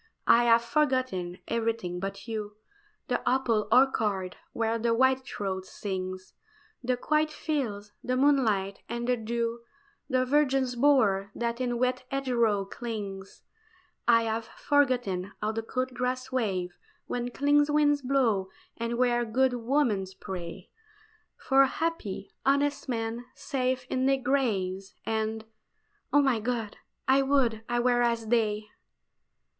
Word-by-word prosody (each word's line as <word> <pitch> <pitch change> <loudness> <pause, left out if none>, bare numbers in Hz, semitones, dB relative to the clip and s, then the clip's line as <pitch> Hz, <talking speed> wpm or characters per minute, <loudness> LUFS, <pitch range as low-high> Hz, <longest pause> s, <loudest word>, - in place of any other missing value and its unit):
I 240 +1 +6
have 230 0 +5
forgotten 245 - 0
everything 225 -6 -1
but 195 +2 -5
you 210 -2 -5 0.5
The - - 0
apple 240 -5 +1
orchard 215 -7 +3 0.2
where 230 0 0
the 230 0 +1
whitethroat 230 -7 0
sings, 185 -2 -5 0.5
The 250 0 0
quiet 305 +4 +1
fields, 235 -11 -3
the 255 0 0
moonlight, 225 -9 +2
and 235 +1 -3
the 250 - +3
dew, 230 +1 -2 0.5
The 255 -1 +2
virgin's 265 -2 +2
bower 225 -8 +3
that 235 +1 -2
in 245 -1 0
wet 255 +1 0
hedgerow 235 -7 +1
clings. 200 -3 -6 0.6
I 230 -1 +6
have 225 0 -2
forgotten 245 -12 0
how 210 +1 -1
the 225 +1 -2
cool 255 +3 -2
grass 255 +1 -3
waves 190 -8 -1 0.3
Where 245 0 -3
clean 290 +3 +3
winds 295 -1 +3
blow, 245 -8 +1 0.3
and 235 0 -2
where 240 -1 +2
good 255 +3 +2
women 240 -5 +1
pray 185 -1 -7 0.7
For 270 0 +4
happy, 290 - -3
honest 280 0 +1
men, 230 0 -2
safe 260 -2 -1
in 260 +1 0
their 270 0 +4
graves; 205 -8 -1
And 220 0 -2 0.7
oh, 290 0 +5
my 260 -5 +2
God! 225 -2 -3 0.3
I 265 +1 +5
would 265 -5 +1
I 240 0 +1
were 245 0 +3
as 235 -2 0
they! 215 -3 +1
235 Hz, 130 wpm, -28 LUFS, 210-260 Hz, 0.7 s, I